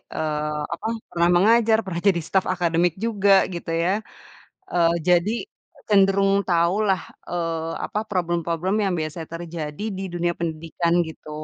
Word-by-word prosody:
eee, 150 -1 -2
apa, 210 +6 -5 0.2
pernah 170 -1 +2
mengajar, 220 +4 +5
pernah 170 -2 -4
jadi 175 -3 +4
staf 190 -1 +1
akademik 175 -1 +1
juga 200 -3 +3 0.2
gitu 170 -1 -5
ya. 180 - +2 0.8
Eee, 170 -1 +3
jadi, 180 +5 +3 0.6
cenderung 195 0 +4
tahulah, 185 +3 +2 0.2
eee, 165 -2 -3
apa, 210 - -3
problem-problem 175 -1 -1
yang 195 - 0
biasa 155 +1 -4
terjadi 165 +1 -6
di 195 - -4
dunia 175 0 -1
pendidikan 165 +1 -2
gitu. 160 -1 -11
175 Hz, 130 wpm, -23 LUFS, 165-195 Hz, 0.8 s, mengajar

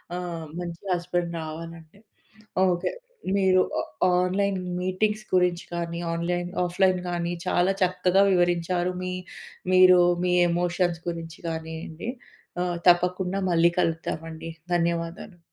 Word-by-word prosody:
ఆహ్, 170 -3 -4
మంచి 170 -1 -6
హస్బెండ్ 175 -1 -2
రావాలంటే. 165 +3 -9 0.7
ఓకే. 175 0 0 0.5
మీరు 185 -1 +4 0.2
ఆ 180 +9 0 0.2
ఆన్‌లైన్ 195 +1 0 0.2
మీటింగ్స్ 210 +4 0
గురించి 180 -1 +2
కానీ, 170 0 -3
ఆన్‌లైన్, 175 +1 -1 0.2
ఆఫ్‌లైన్ 185 +1 +2
గానీ, 175 0 -2
చాలా 180 +2 +3
చక్కగా 185 +1 +3
వివరించారు. 175 0 +1
మీ 185 0 -3 0.6
మీరూ 185 -1 +8 0.3
మీ 180 - +2 0.2
ఎమోషన్స్ 175 0 0
గురించి 165 0 -6
గానియండి. 160 +4 -6 0.5
ఆహ్, 175 -1 -2
తప్పకుండా 180 +2 +2
మళ్ళీ 170 0 +4
కలుద్దామండి. 165 -1 -2 0.2
ధన్యవాదాలు. 170 +1 -2
175 Hz, 110 wpm, -26 LUFS, 170-180 Hz, 0.7 s, మీరూ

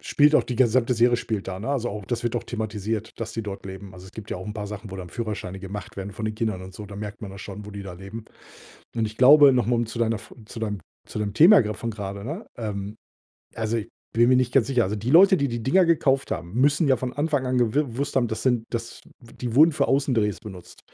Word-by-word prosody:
spielt 150 +1 +3
auch - - +6
die 125 - -4
gesamte 125 0 +3
Serie 120 +1 +4
spielt 110 -4 -4
da, 95 -1 -4
ne? 105 - -5
Also, 135 -4 0
auch 105 -2 -6
das 120 +5 -3
wird 120 0 -1
auch - - -3
thematisiert, 110 -1 -4
dass 115 0 -5
die 115 - -3
dort 100 -2 -7
leben. 95 0 -9
Also, 90 - -12
es 95 - -14
gibt 110 -2 -10
ja - - -2
auch 90 - -7
'n 105 - -4
paar 105 -1 -5
Sachen, 105 0 -8
wo 95 - -6
dann 90 -2 -7
Führerscheine 105 -4 -5
gemacht 105 +3 -7
werden 100 +1 -5
von 110 - -6
den 110 - -3
Kindern 110 -4 -2
und 95 0 -11
so. 105 - -8
Da 100 0 -10
merkt 105 +1 -7
man 100 - -6
das 95 - -10
schon, 105 0 -8
wo 105 - -9
die 100 -1 -7
da 95 -2 -8
leben. 100 +5 -9 0.7
Und 115 -1 +1
ich 110 +1 -8
glaube 140 +2 +8
noch 125 -4 +2
mal 120 +1 +2
um 120 0 0
zu 115 +1 -7
deiner 115 -1 +1
F 105 - -13
zu 115 - -9
deinem 105 -3 -3 0.3
zu - - -6
deinem 105 -1 -2
Thema 180 - +8
grad 105 -2 -4
von 115 - -4
grade, 100 -2 -6
ne 160 - -6
ähm, 105 -2 -4 0.6
also, 115 0 -1 0.4
bin 120 +1 +4
mir 130 - +5
nicht 125 -1 +1
ganz 130 -4 +4
sicher. 125 -4 +2
Also, 105 +3 -2
die 115 +5 -3
Leute, 190 +4 +7
die 140 -1 +1
die 120 -1 -4
Dinger 180 +10 +4
gekauft 135 -5 +2
haben, 85 0 -4
müssen 145 +6 +3
ja 130 - +4
von 125 -1 -4
Anfang 145 -2 0
an 130 0 0
gewi 120 -3 +2
gewusst 135 +2 -4
haben, 125 -3 +3
das 110 - -4
sind 120 -3 +1
das 115 -1 -5 0.2
die 120 0 -6
wurden 155 +5 +7
für 150 - 0
Außendrehs 125 -7 +1
benutzt. 95 -6 -11
115 Hz, 270 wpm, -24 LUFS, 105-125 Hz, 0.7 s, glaube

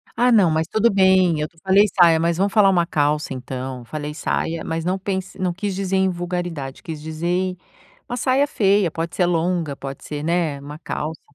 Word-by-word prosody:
Ah, 245 +1 +3
não, 195 -7 +5
mas 160 +1 0
tudo 220 +4 +2
bem, 190 -4 +4
eu 150 - -1
te 165 - -31
falei 195 +2 +5
"saia", 170 -4 +4
mas 170 0 +1
vamos 195 +2 +1
falar 205 -2 +5
uma 175 -3 +3
"calça" 150 -2 0
então, 130 -1 -6
falei 150 +2 -5
"saia", 165 +1 -2
mas 165 0 -3
não 180 +3 0
pense 190 -1 -4
não 180 -2 0
quis 200 +2 -3
dizer 190 0 -2
em 190 0 +3
"vulgaridade", 175 -6 -4
quis 160 -2 -6
dizer 175 +4 -2 0.5
uma 245 - -3
"saia 265 +3 +2
feia", 200 - +2
pode 165 +2 -4
ser 180 - +2
longa, 170 -3 0
pode 135 0 -8
ser, 150 -1 -5
né, 165 -3 0
uma 145 +2 -9
"calça". 155 -2 -5
175 Hz, 200 wpm, -21 LUFS, 155-190 Hz, 0.5 s, não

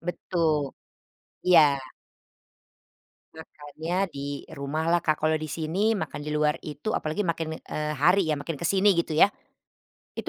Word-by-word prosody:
Betul, 165 -4 -1 0.7
iya. 155 -6 +6 1.6
Makannya 160 +1 -7 0.2
di 140 0 -5
rumah 140 +3 -3
lah, 175 - +4
Kak, 155 -2 +1
kalau 155 0 +3
di 155 - -5
sini 180 +9 0
makan 195 - -4
di 150 - -6
luar 150 +1 +1
itu 150 +9 -4
apalagi 155 +7 -1
makin, 165 -2 -2
eee, 150 0 -3
hari 180 +5 +3
ya, 155 - +1
makin 145 +1 -5
ke 170 - 0
sini, 195 +1 +5
gitu 170 -3 -1
ya, 200 +6 +6 0.8
itu - - -6
160 Hz, 145 wpm, -26 LUFS, 150-175 Hz, 1.6 s, iya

